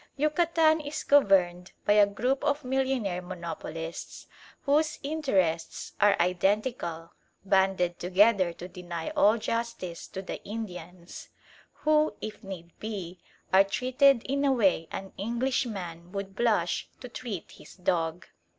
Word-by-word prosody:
Yucatan 315 +1 +3
is 295 +1 -5
governed 185 -9 +3
by 205 - +5
a 210 -1 +6
group 250 +7 -1
of 290 +1 0
millionaire 255 -8 0
monopolists 165 -2 -6 0.4
whose 300 +2 +2
interests 195 - -1
are 205 0 +5
identical, 180 -1 0 0.3
banded 190 -2 +2
together 185 0 +4
to 175 +1 -9
deny 175 -2 -6
all 210 +3 +4
justice 230 -7 -4
to 190 - -7
the - - -6
Indians, 180 -5 -8 0.6
who, 305 -5 +3
if 215 -1 -7
need 180 -3 -8
be, 190 -5 -6 0.3
are 190 +1 +8
treated 255 +5 +3
in 280 +1 -1
a 280 - +4
way 195 -9 +2
an 195 0 -6
Englishman 210 -7 -2
would 195 -1 -5
blush 210 -7 +1
to 250 - -8
treat 235 -7 -6
his - - -14
dog. 175 -2 -1
200 Hz, 125 wpm, -28 LUFS, 180-255 Hz, 0.6 s, are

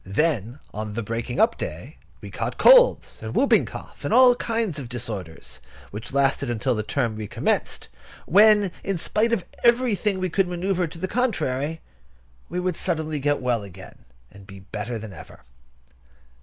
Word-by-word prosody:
Then, 120 - -1 0.2
on 105 0 -5
the 115 - -2
breaking 115 +3 -4
up 230 +1 +3
day, - - -6 0.2
we - - -9
caught - - -4
colds, - - +5
and - - -6
whooping - - +4
cough, - - -10
and - - -2
all 255 -1 +7
kinds 225 -9 -2
of 125 -4 -7
disorders, 105 -9 -6 0.3
which 105 +2 -7
lasted 135 -3 +1
till 130 +3 +1
the 110 - -1
term 115 +1 -1
recommenced; 105 -1 -2 0.4
when, 205 0 +5
in 195 -1 -1
spite 215 +7 0
of 225 -6 0 0.2
everything 235 -5 +2
we 185 -2 -2
could 195 +1 +2
manœuvre 180 0 -1
to 165 - -10
the 190 - -3
contrary, 160 - -1 0.7
we 180 - -3
would 180 0 -1
get - - -2
suddenly 155 -4 -1
well 125 -5 0
again, 95 -1 -12 0.3
and 100 0 -15
be 100 -2 -11
better 105 +4 -5
than 110 -2 -8
ever. 85 - -13
145 Hz, 165 wpm, -24 LUFS, -, 0.7 s, all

